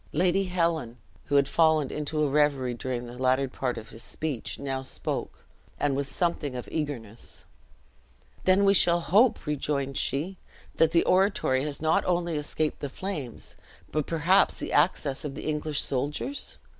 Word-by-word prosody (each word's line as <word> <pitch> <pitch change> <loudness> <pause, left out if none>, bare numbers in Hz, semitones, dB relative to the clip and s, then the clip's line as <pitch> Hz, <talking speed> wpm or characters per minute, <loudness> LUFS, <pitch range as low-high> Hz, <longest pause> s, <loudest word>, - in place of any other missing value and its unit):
Lady 185 +4 +2
Helen, 165 -9 -1 0.3
who 145 - -1
had 140 -1 +5
fallen 160 -3 +3
into 150 +1 -1
a - - +3
reverie 140 -3 +2
during 125 0 -4
the 120 +1 -10
latter 130 +1 +2
part 125 -1 -3
of 110 - -8
his 115 - -11
speech, 145 -1 -4
now 135 -1 -3
spoke, 130 - -5 0.3
and 145 -2 +1
with 140 0 -2
something 150 -4 -1
of 125 - -6
eagerness. 120 -8 -5 1.0
"Then 190 +2 +5
we 195 - +6
shall 175 -3 +5
hope," 210 +7 +3
rejoined 140 -2 -2
she, 175 +7 -1 0.4
"that 165 -1 +4
the 170 0 +4
oratory 185 -9 +2
has 150 +1 -4
not 160 0 +3
only 175 -2 0
escaped 150 +1 -2
the 145 - -4
flames, 150 - -6 0.4
but 155 -2 -1
perhaps 170 +4 +3
the - - -4
access 140 -6 +2
of 145 -2 -5
the - - -7
English 150 -1 -1
soldiers? 150 - -3
150 Hz, 160 wpm, -27 LUFS, 135-170 Hz, 1.0 s, we